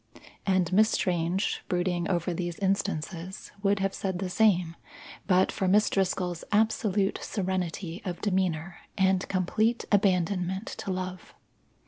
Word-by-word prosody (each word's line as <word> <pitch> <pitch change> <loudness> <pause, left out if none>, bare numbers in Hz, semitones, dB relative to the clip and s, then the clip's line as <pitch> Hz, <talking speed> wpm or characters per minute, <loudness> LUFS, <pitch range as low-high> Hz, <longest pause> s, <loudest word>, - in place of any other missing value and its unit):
And 185 -2 +2
Miss 215 +3 +5
Strange, 175 0 0
brooding 175 -1 0
over 175 0 0
these 175 0 -3
instances, 190 -2 -2
would 200 0 +2
have 195 0 0
said 190 -2 -2
the 185 0 -3
same, 180 -6 +3 0.5
but 185 -1 +4
for 190 - -1
Miss 210 +3 +4
Driscoll's 180 -3 0
absolute 210 -2 +2
serenity 185 -2 -3
of 180 -3 -4
demeanour 185 -3 -1 0.2
and 190 -1 +2
complete 215 +5 +1
abandonment 190 0 +1
to 195 - -3
love. 185 -1 -5
185 Hz, 125 wpm, -28 LUFS, 175-195 Hz, 0.5 s, Miss